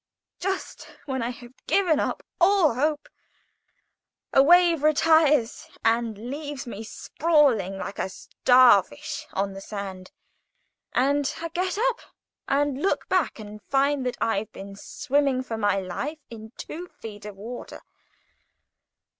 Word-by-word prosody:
Just 385 +1 -5
when 265 -3 -2
I 230 - -1
have 245 0 -10
given 355 -6 +3
up - - -2 0.2
all 360 -5 +4
hope, 295 +4 -1 1.3
a 270 - +7
wave 340 +1 +5
retires 305 -4 +3 0.2
and 230 0 0
leaves 290 -1 -5
me 225 -3 -7
sprawling 255 - +1
like 195 - -6
a - - -1
star 245 +2 +5
fish 115 - -8
on 195 0 -1
the 195 - -8
sand, 195 -3 -7 0.8
and 280 +2 +2
I 335 - -4
get 365 +3 -2
up 485 +2 +1 0.5
and 285 0 0
look 390 - 0
back 370 -6 +1
and 210 -1 -10
find 275 +2 +1
that 250 - -3
I've 220 -1 -1
been 195 0 -9
swimming 275 +4 0
for 235 -3 -5
my 205 -3 +1
life 195 - -4
in 220 -1 -10
two 350 +3 -7
feet 210 -9 -11
of 210 -1 -8
water. 230 +5 -8
260 Hz, 135 wpm, -25 LUFS, 215-305 Hz, 1.3 s, a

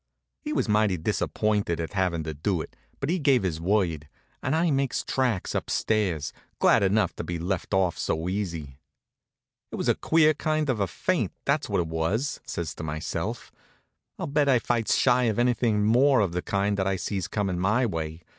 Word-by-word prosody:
He 300 - -4
was 300 - 0
mighty 105 -3 +2
disappointed 100 +2 0
at 80 +2 -4
havin' 90 -4 0
to 80 0 -4
do 85 +5 -1
it, - - -7 0.2
but 140 - -1
he 185 - 0
gave 135 -7 +3
his 80 -4 -2
word, 85 -6 0 0.3
and 135 - 0
I 165 0 +2
makes 135 -2 0
tracks 125 -8 -1
up - - -2
stairs, 95 -9 0 0.2
glad - - +4
enough 100 +2 +2
to - - -3
be 85 - -3
let 90 +2 -3
off 95 -3 +1
so 80 +2 -1
easy. 85 -8 -4 0.9
"It - - -4
was - - -2
a - - +5
queer 155 -1 +3
kind 155 -1 0
of 115 - -3
a 100 - +1
faint, 80 - -1
if - - -49
that's - - +1
what - - +1
it 85 - -3
was," 85 - -1
says 80 -3 -4
I - - -24
to - - -4
myself. 80 0 -4 0.7
"I'll - - -3
bet 145 0 +1
I 130 - +5
fights 115 -1 +1
shy 125 -1 +3
of 110 -3 0
anything 120 -3 +2
more 130 +5 +4
of 95 -4 +1
the 90 +1 -2
kind 100 +1 0
that 95 -1 0
I 95 - +1
sees 95 -1 -3
comin' 95 -4 -1
my 110 +7 +2
way. 80 -4 -4
100 Hz, 200 wpm, -26 LUFS, 85-125 Hz, 0.9 s, a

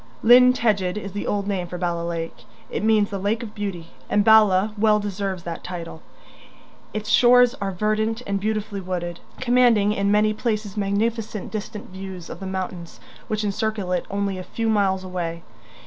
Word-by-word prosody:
Llyn 250 +2 +8
Tegid 205 -7 0
is 200 -2 -5
the 205 +2 -4
old 200 -1 -1
name 190 -3 -2
for 180 - -6
Bala 175 -1 -1
Lake; 170 -1 -5 0.3
it - - -3
means 215 -2 +3
the 200 - -3
lake 215 +5 -1
of 215 -2 -8
beauty, 185 -5 -5 0.2
and 205 -1 +2
Bala 215 -2 +5
well 210 0 +3
deserves 195 -3 -3
that 170 -1 -6
title. 170 -3 -7 0.9
Its 215 0 -4
shores 245 +2 +6
are 200 - -1
verdant 215 +4 -1
and 200 0 -1
beautifully 215 -1 -2
wooded, 175 -2 -4 0.2
commanding 240 -5 +4
in 200 -1 0
many 210 +1 +3
places 215 -3 -2
magnificent 210 +1 -2
distant 215 -2 -6
views 190 -2 -8
of 170 - -8
the 195 - -6
mountains 185 -2 -5 0.3
which 215 0 -2
encircle 205 -2 -2
it 180 - -1
only 200 -1 -2
a - - -5
few 225 +4 -2
miles 195 -3 +1
away. 170 -2 -4
200 Hz, 175 wpm, -23 LUFS, 185-215 Hz, 0.9 s, Llyn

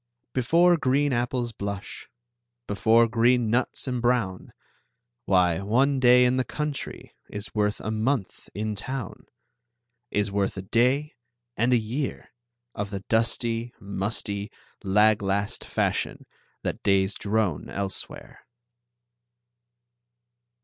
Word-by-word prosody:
Before 170 +7 +4
green 140 0 +2
apples 120 0 -1
blush, 100 -2 -6 0.6
Before 115 +3 +4
green 120 0 +3
nuts 120 +3 0
embrown, 120 -6 0 0.7
Why, 90 -3 +3
one 130 +8 +2
day 125 0 +6
in 125 +1 +2
the 130 - +2
country 150 +1 -5 0.2
Is 105 0 -7
worth 105 -1 0
a 110 - -4
month 110 -1 -2
in 105 +1 -2
town; 120 +1 -6 0.8
Is 105 -1 0
worth 100 -1 -1
a 95 - -4
day 125 +9 +1 0.4
and 120 +3 +1
a 125 - +6
year 120 +6 -3 0.4
Of 100 0 -4
the 100 -1 -5
dusty, 115 +2 0
musty, 100 +1 -3 0.3
lag 105 +2 +4
last 100 +1 -1
fashion - - -1 0.4
That - - -3
days 95 0 +2
drone 105 -6 -1
elsewhere. 100 -1 -5
110 Hz, 110 wpm, -26 LUFS, 100-125 Hz, 0.8 s, day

